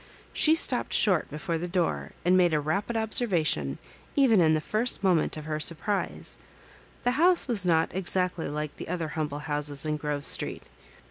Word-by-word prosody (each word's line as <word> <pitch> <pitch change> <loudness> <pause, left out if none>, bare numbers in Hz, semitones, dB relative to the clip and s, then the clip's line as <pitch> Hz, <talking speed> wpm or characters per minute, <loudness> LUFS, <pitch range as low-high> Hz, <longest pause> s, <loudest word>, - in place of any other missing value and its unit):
She 315 +1 +4
stopped 255 -6 +1
short 185 -6 +3
before 160 +3 -3
the 175 - -4
door 170 - -2
and 180 +1 +4
made 175 -3 +3
a - - +2
rapid 195 +10 -2
observation 175 - +1 0.4
even 245 -9 +4
in 160 -1 +4
the - - +1
first 215 +8 -2
mo 190 -2 +4
ment 160 -1 0
of 155 - -8
her 155 -1 -3
surprise. 155 - -2 0.7
The 245 - +2
house 355 -3 +4
was 210 -7 +3
not 165 -1 +2
ex 190 +1 -2
actly 180 -4 -1
like 150 0 -4
the - - -8
other 170 -3 -3
humble 150 -2 -4
houses 145 -1 -1
in 155 0 -1
Grove 145 -1 -4
Street. - - -1
165 Hz, 185 wpm, -27 LUFS, 150-195 Hz, 0.7 s, She